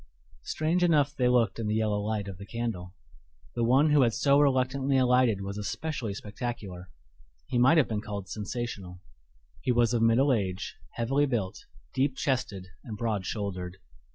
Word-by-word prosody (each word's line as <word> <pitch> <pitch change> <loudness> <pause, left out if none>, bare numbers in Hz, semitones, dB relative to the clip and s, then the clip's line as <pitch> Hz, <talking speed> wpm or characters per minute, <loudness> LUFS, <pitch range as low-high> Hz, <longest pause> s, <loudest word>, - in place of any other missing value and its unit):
Strange 160 - 0
enough 150 -4 +3
they 125 -3 +2
looked 120 -4 +2
in 110 - -2
the 105 - 0
yellow 105 -2 +1
light 105 -1 -2
of 95 -2 -8
the 100 - -8
candle. 105 -7 -4 0.6
The 120 - -1
one 135 +6 +4
who 145 -1 +5
had 115 -3 +3
so 140 0 +4
reluctantly 135 0 +2
alighted 125 -5 +3
was 100 +1 -5
especially 115 0 -3
spectacular 105 -4 -6 0.6
he 120 - -1
might 135 +7 +6
have 150 - +4
been 105 -2 -2
called 100 -2 -6
sensational. 100 -3 -5 0.6
He 130 - +1
was 120 -1 +3
of 120 - +1
middle 120 +5 +4
age, 95 -5 -2 0.2
heavily 135 +5 +1
built, 110 -8 -3 0.3
deep 135 0 +1
chested, 120 -10 -2
and 110 -2 -7
broad 105 -5 -2
shouldered. 95 -4 -4
115 Hz, 165 wpm, -28 LUFS, 100-130 Hz, 0.6 s, might